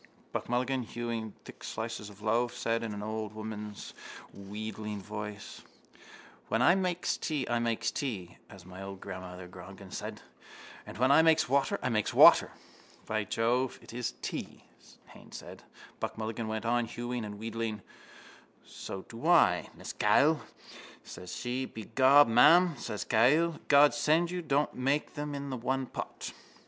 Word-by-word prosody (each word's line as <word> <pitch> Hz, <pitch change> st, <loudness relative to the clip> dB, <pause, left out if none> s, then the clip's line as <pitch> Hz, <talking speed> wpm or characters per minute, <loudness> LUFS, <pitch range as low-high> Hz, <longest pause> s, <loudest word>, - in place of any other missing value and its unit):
Buck -, -, -4 dB
Mulligan, 130 Hz, +2 st, 0 dB
hewing 115 Hz, -2 st, -4 dB
thick -, -, -12 dB
slices 110 Hz, -2 st, -5 dB
from 105 Hz, -, -12 dB
the 105 Hz, -, -12 dB
loaf, 120 Hz, +2 st, +1 dB
said 115 Hz, 0 st, 0 dB
in 115 Hz, -2 st, -4 dB
an 105 Hz, -, -6 dB
old 110 Hz, 0 st, -4 dB
woman's 105 Hz, -1 st, -7 dB, 0.4 s
wheedling 105 Hz, +1 st, -6 dB
voice: 105 Hz, +1 st, -7 dB, 0.9 s
—When 110 Hz, -, +1 dB
I 130 Hz, +8 st, +6 dB
makes 180 Hz, -2 st, 0 dB
tea 150 Hz, -5 st, -2 dB
I 120 Hz, 0 st, +1 dB
makes 115 Hz, -1 st, 0 dB
tea, 100 Hz, -, -4 dB
as 95 Hz, -3 st, -13 dB
old 95 Hz, +1 st, -9 dB
mother 90 Hz, -1 st, -7 dB
Grogan 95 Hz, +1 st, -11 dB
said. -, -, -6 dB, 0.6 s
And -, -, -9 dB
when 130 Hz, +3 st, +3 dB
I 150 Hz, -, +7 dB
makes 160 Hz, -1 st, +4 dB
water 140 Hz, +2 st, +2 dB
I -, -, +1 dB
makes 110 Hz, -3 st, 0 dB
water. -, -, +8 dB, 0.6 s
—By 110 Hz, -1 st, -1 dB
Jove, 120 Hz, +5 st, 0 dB
it -, -, -13 dB
is 125 Hz, -1 st, -3 dB
tea, -, -, -5 dB, 0.5 s
Haines -, -, -12 dB
said. -, -, -11 dB, 0.4 s
Buck -, -, -4 dB
Mulligan 110 Hz, 0 st, -3 dB
went 110 Hz, 0 st, -3 dB
on 120 Hz, 0 st, +2 dB
hewing 120 Hz, 0 st, -4 dB
and 105 Hz, -1 st, -6 dB
wheedling: 110 Hz, -1 st, -4 dB, 0.8 s
—So 95 Hz, -, -7 dB
I -, -, -21 dB
do, 115 Hz, -, -10 dB, 0.6 s
Mrs -, -, -8 dB
Cahill, 150 Hz, +2 st, +4 dB, 0.6 s
says 90 Hz, -, -8 dB
she. 130 Hz, +1 st, -3 dB
Begob, 130 Hz, +6 st, +4 dB
ma'am, 165 Hz, +10 st, +6 dB
says 105 Hz, -6 st, -5 dB
Mrs -, -, -29 dB
Cahill, 150 Hz, +9 st, +4 dB
_God 145 Hz, 0 st, +7 dB
send 155 Hz, +4 st, +2 dB
you 180 Hz, 0 st, -3 dB
don't 145 Hz, -2 st, 0 dB
make 135 Hz, +4 st, 0 dB
them 145 Hz, 0 st, -4 dB
in 140 Hz, -1 st, -5 dB
the 130 Hz, -, -3 dB
one 130 Hz, +2 st, -1 dB
pot. -, -, -6 dB
115 Hz, 160 wpm, -30 LUFS, 105-135 Hz, 0.9 s, water